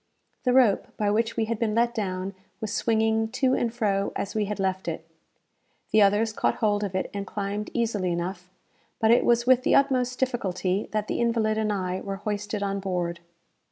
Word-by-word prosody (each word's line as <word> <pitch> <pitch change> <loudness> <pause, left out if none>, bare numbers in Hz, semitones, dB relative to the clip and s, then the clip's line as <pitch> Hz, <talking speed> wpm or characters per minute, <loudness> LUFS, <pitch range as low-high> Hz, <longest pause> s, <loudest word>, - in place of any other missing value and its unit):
The 250 - +4
rope 250 -6 +4
by 205 -1 +1
which 225 +2 0
we 225 - +2
had 225 -1 -3
been 215 -2 0
let 235 +1 +2
down, 190 -3 -3 0.3
was 215 -2 -4
swinging 220 -1 +1
to 260 -1 +2
and 240 -3 +1
fro 200 -4 0
as 200 - -3
we 215 -1 0
had 210 0 -4
left 190 -1 -1
it. 165 0 -4 0.8
The 215 - +5
others 205 +2 +3
caught - - +1
hold 210 -1 +1
of 195 -2 -3
it 190 - -2
and 200 -1 -4
climbed 205 0 -3
easily 215 -6 0
enough, 180 +1 -4 0.5
but 220 0 +4
it 240 - +5
was 235 0 +3
with 255 0 +5
the - - +3
utmost 255 -2 +2
difficulty 195 -6 -1
that 215 -1 -1
the - - -1
invalid 225 -2 +1
and 215 -1 0
I 185 -2 -2
were 195 -1 -3
hoisted 205 +1 -3
on 200 0 -1
board. 175 -3 -2
210 Hz, 195 wpm, -26 LUFS, 195-230 Hz, 0.8 s, The